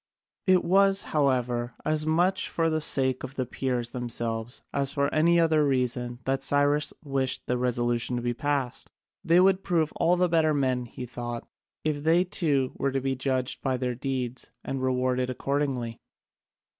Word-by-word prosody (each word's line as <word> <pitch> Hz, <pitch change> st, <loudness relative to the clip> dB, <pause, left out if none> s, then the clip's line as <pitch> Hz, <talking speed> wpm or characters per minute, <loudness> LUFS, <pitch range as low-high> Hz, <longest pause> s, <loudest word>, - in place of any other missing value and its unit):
It 185 Hz, -1 st, +5 dB
was, 195 Hz, +2 st, +4 dB
however, 125 Hz, -5 st, +1 dB
as 155 Hz, 0 st, +2 dB
much 175 Hz, +4 st, +2 dB
for 165 Hz, -1 st, 0 dB
the 155 Hz, 0 st, 0 dB
sake 130 Hz, -3 st, +2 dB
of 130 Hz, +1 st, -7 dB
the 130 Hz, -, -1 dB
Peers 125 Hz, -1 st, -2 dB
themselves 120 Hz, -1 st, -4 dB
as 140 Hz, -1 st, +1 dB
for 140 Hz, +1 st, -1 dB
any 170 Hz, +2 st, +4 dB
other 160 Hz, -2 st, +3 dB
reason 125 Hz, -3 st, -1 dB
that 135 Hz, 0 st, 0 dB
Cyrus 145 Hz, +2 st, +2 dB
wished 135 Hz, -3 st, -2 dB
the 125 Hz, -, 0 dB
resolution 120 Hz, -1 st, 0 dB
to 120 Hz, -, -3 dB
be 120 Hz, 0 st, 0 dB
passed. 140 Hz, -1 st, -2 dB, 0.3 s
They 170 Hz, +2 st, +4 dB
would 190 Hz, +1 st, +4 dB
prove 165 Hz, -5 st, 0 dB
all 175 Hz, +2 st, +3 dB
the 180 Hz, 0 st, +2 dB
better 160 Hz, -2 st, +2 dB
men, 130 Hz, -3 st, 0 dB
he 125 Hz, -, -7 dB
thought, 120 Hz, -1 st, -6 dB, 0.4 s
if 150 Hz, -2 st, -1 dB
they 165 Hz, +4 st, +4 dB
too 145 Hz, -7 st, 0 dB
were 140 Hz, -, +1 dB
to 135 Hz, -, 0 dB
be 135 Hz, 0 st, -1 dB
judged 130 Hz, -1 st, -2 dB
by 130 Hz, -2 st, 0 dB
their 125 Hz, 0 st, -2 dB
deeds 130 Hz, -1 st, -4 dB
and 135 Hz, -1 st, -3 dB
rewarded 130 Hz, 0 st, 0 dB
accordingly. 130 Hz, -3 st, -2 dB
135 Hz, 170 wpm, -27 LUFS, 125-155 Hz, 0.4 s, It